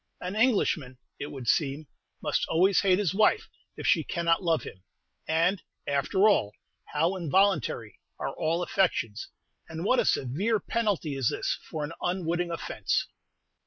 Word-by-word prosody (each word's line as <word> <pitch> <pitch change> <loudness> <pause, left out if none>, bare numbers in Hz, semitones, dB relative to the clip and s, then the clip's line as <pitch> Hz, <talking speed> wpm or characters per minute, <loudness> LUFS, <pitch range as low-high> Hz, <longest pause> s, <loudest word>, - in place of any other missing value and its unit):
An 180 +2 -5
Englishman, 195 - +1 0.2
it 145 - -4
would 130 -4 -8
seem, 145 +3 +1 0.4
must - - 0
always 185 +3 +3
hate 185 -2 +4
his 190 -4 0
wife 220 - +3 0.3
if - - -6
she - - +4
cannot 170 0 +1
love 165 -4 +1
him; 95 - -10 0.5
and, 165 +4 +2 0.2
after 145 +9 +2
all, 105 - +2 0.3
how 165 +5 0
involuntary 170 - +1 0.2
are - - -3
all 165 +3 0
affections, 125 - 0 0.4
and 165 +2 -5
what 255 - +3
a - - +2
severe 190 - +1
penalty 200 -8 -1
is 135 -4 +1
this - - -2
for 155 -2 -3
an 150 +3 -5
unwitting 175 -1 -1
offence! 170 - -1
170 Hz, 150 wpm, -28 LUFS, 145-195 Hz, 0.5 s, hate